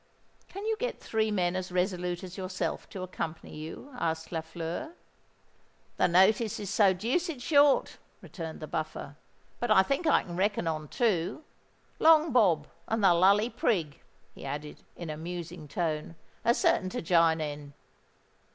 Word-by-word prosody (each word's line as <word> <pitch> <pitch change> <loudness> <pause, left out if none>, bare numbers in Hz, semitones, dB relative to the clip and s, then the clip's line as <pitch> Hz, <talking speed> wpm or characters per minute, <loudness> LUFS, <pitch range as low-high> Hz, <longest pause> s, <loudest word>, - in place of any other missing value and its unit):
"Can 395 +2 -7
you 445 0 0
get - - -3
three 220 -1 0
men 180 -4 0
as 185 0 -3
resolute 180 -1 -1
as 185 -1 -8
yourself 185 -1 -4
to 190 - -6
accompany 165 -3 -5
you?" 160 - -8
asked 160 -1 -2
Lafleur. 165 - -4 1.0
"The - - +4
notice 190 +5 +3
is 200 -2 -4
so 200 -2 +5
deuced 260 - -1
short," 285 +1 +3 0.2
returned 165 -4 -8
the 155 - -5
Buffer; 155 -3 -4 0.4
"but 240 - -2
I 190 -3 +6
think 275 - -1
I 310 - +4
can 175 - -8
reckon 205 -1 +1
on 155 -1 -2
two. 210 - 0 0.6
Long 320 -1 +6
Bob 180 -11 +4 0.2
and 225 -1 -1
the 185 -3 +7
Lully 200 +6 +4
Prig," 165 -10 -1 0.3
he - - -12
added, 145 +2 -6
in 170 -3 -6
a 150 - -6
musing 170 -1 -6
tone, 155 0 -2 0.3
"are 235 - +4
certain 185 - +2
to - - -4
jine 165 -1 +4
in." 145 -2 -5
180 Hz, 155 wpm, -29 LUFS, 160-220 Hz, 1.0 s, the